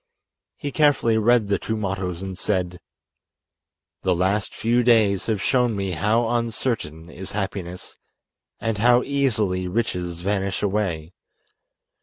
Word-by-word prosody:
He 145 - -4
carefully 135 -7 +3
read 115 -1 +3
the 100 - +1
two 110 - -3
mottoes 95 -3 -3
and 95 -1 -5
said: 90 -2 -2 1.2
"The 90 -1 +1
last 95 +4 0
few 120 +2 +2
days 110 -5 +3
have 110 -4 -1
shown 125 -4 +2
me 100 -1 -2
how 105 +8 +1
uncertain 115 - -2
is 90 +2 -8
happiness 95 -3 -5 0.6
and 115 -2 -2
how 120 +2 +5
easily 110 -10 0
riches 90 -4 -2
vanish 100 +1 -1
away. 95 -5 -1
100 Hz, 125 wpm, -23 LUFS, 90-115 Hz, 1.2 s, how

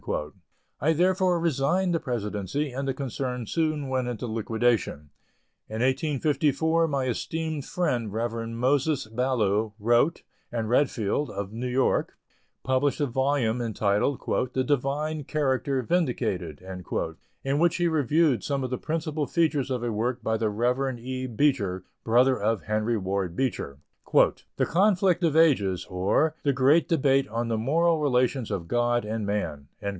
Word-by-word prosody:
I 155 +5 +2
therefore 180 +1 +2
resigned 170 +4 +1
the 165 - +1
presidency 120 +3 -3
and 135 +2 -4
the 135 - 0
concern 125 -2 -3
soon 155 0 -1
went 130 -1 -1
into 125 -1 -4
liquidation. 110 -9 -1 0.6
In 110 +1 -4
1854, 150 +4 +1
my 140 -3 -1
esteemed 155 +4 -3
friend, 125 - -1
Reverend 115 +1 -3
Moses 140 +2 +1
Ballou, 110 -3 0
wrote, 120 +9 +2 0.3
and 115 -2 -2
Redfield, 125 +1 +1
of 100 0 -5
New 120 +3 -3
York, 130 +1 0 0.5
published 130 +3 +1
a 145 - +2
volume 130 -2 0
entitled 110 +3 0 0.3
"The 130 - +1
Divine 145 +3 -1
Character 135 -3 0
Vindicated" 110 - -1 0.8
in 135 +2 0
which 170 +1 +3
he 175 -1 +1
reviewed 155 -2 +2
some 140 -2 -1
of 130 - -4
the 125 - -2
principal 155 -2 -2
features 155 -5 +1
of 125 -2 -2
a 120 - -1
work 120 +3 -2
by 110 - 0
the 110 -1 0
Rev. 125 +4 0
E. 130 +2 -4
Beecher, 110 -7 0 0.2
brother 125 +3 +3
of 110 0 0
Henry 110 +2 0
Ward 95 -3 -2
Beecher, 110 - -2 0.8
"The - - +2
Conflict 185 -1 +2
of 160 -2 +2
Ages; 100 - +3
or, 100 +13 +1
the 140 - +3
Great 140 +5 +3
Debate 135 -5 +2
on 115 +2 -2
the 115 -1 0
Moral 160 +7 +2
Relations 130 -3 +1
of 85 -4 -3
God 120 +2 +1
and 110 0 -3
Man." 75 -9 -3
130 Hz, 145 wpm, -26 LUFS, 115-150 Hz, 0.8 s, which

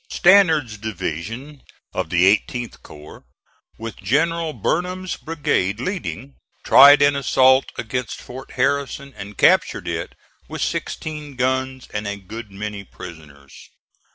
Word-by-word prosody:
Stannard's 160 - +4
division 110 - -5 0.3
of - - -3
the 90 +4 +5
18th 120 +2 -7
corps 75 0 -13 0.5
with 115 -1 -7
General 165 +4 0
Burnham's 180 +4 -2
brigade 115 - -1
leading, 140 -4 -5 0.3
tried 140 +1 +8
an 145 0 +4
assault 130 -1 +4
against 125 +1 -4
Fort 130 +2 -10
Harrison 140 +1 -1
and 100 +1 -9
captured - - +3
it - - -4 0.3
with - - -3
sixteen 150 -3 -4
guns 130 +1 -1
and 105 0 -3
a 100 - -3
good 105 +3 -9
many 105 0 -6
prisoners. 80 -7 -12
130 Hz, 120 wpm, -21 LUFS, 100-145 Hz, 0.5 s, tried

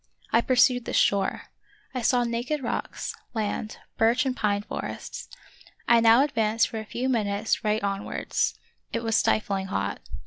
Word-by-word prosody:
I 230 - +4
pursued 250 -1 +3
this - - -3
shore. 200 -1 +2 0.5
I 255 - -2
saw 245 +1 +3
naked 240 +5 -2
rocks, - - -3 0.2
land, 215 0 -2 0.2
birch 235 +4 +3
and 260 -1 0
pine 205 -3 0
forests. - - -6 0.6
I 235 0 +6
now 230 +3 +6
advanced 225 -5 +1
for 225 - -4
a 220 - -7
few 245 +4 -3
minutes 215 -3 0
right 215 -1 0
on 200 0 -1
wards. - - -1 0.4
It 230 - -2
was 225 -1 +1
stifling 195 -3 +1
hot. 200 - -2
225 Hz, 160 wpm, -26 LUFS, 210-245 Hz, 0.6 s, I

